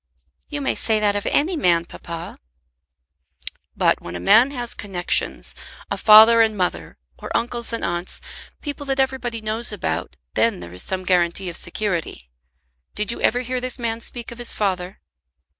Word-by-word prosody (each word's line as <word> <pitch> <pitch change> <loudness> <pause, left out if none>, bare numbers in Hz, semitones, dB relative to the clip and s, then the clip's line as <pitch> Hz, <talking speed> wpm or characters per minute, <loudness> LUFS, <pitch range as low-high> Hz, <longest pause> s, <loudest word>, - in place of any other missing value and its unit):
"You 290 -1 -4
may 270 - +1
say 220 -1 +1
that 205 -1 +2
of 205 - -2
any 340 +5 +2
man, 170 - +2
papa." 170 0 -8 1.4
"But - - +2
when 85 - -7
a - - -4
man 225 - +6
has 245 -4 -3
connexions, 185 -4 -2 0.4
a - - +1
father 220 +2 +8
and 220 -2 +2
mother, 180 -2 -2 0.2
or - - -7
uncles 240 0 0
and 230 - -2
aunts, 175 +1 -2 0.4
people 285 -1 -6
that 270 0 0
everybody 255 -4 -1
knows 220 +2 -1
about, - - -3 0.2
then 230 -4 +2
there 85 - -10
is 90 - 0
some 185 -1 -3
guarantee 180 0 +1
of 170 - -8
security. 170 - -2 0.6
Did 210 +1 +1
you - - -5
ever 245 - +2
hear 255 0 -3
this 255 0 -3
man 230 -2 -3
speak 240 0 -6
of 235 - -10
his 240 - 0
father?" 190 -2 -2
215 Hz, 170 wpm, -22 LUFS, 180-240 Hz, 1.4 s, father